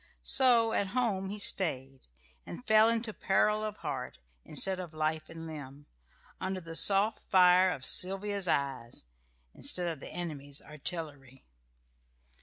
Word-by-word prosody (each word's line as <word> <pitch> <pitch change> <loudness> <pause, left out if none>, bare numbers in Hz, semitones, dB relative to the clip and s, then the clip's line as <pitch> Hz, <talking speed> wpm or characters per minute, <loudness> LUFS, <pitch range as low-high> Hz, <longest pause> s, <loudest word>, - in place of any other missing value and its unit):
So 240 -4 +4
at 200 - 0
home 195 -6 -1
he 205 - -5
stayed, 135 -10 -2 0.4
and 245 - -10
fell 220 +1 +5
into 230 -1 -1
peril 210 +3 +1
of 215 -1 -5
heart, 135 -4 -5 0.3
instead 185 +5 0
of 170 -3 -8
life 155 0 -2
and 165 0 -9
limb, 145 -2 -10 0.5
under 190 0 -3
the 165 -2 -9
soft 200 +5 +3
fire 185 0 +5
of 135 -7 -4
Sylvia's 195 +1 +2
eyes, 135 - -2 0.5
instead 180 -1 0
of 165 -4 -4
the - - -10
enemy's 145 -5 -6
artillery. 145 -4 -8
180 Hz, 135 wpm, -30 LUFS, 150-200 Hz, 0.5 s, fell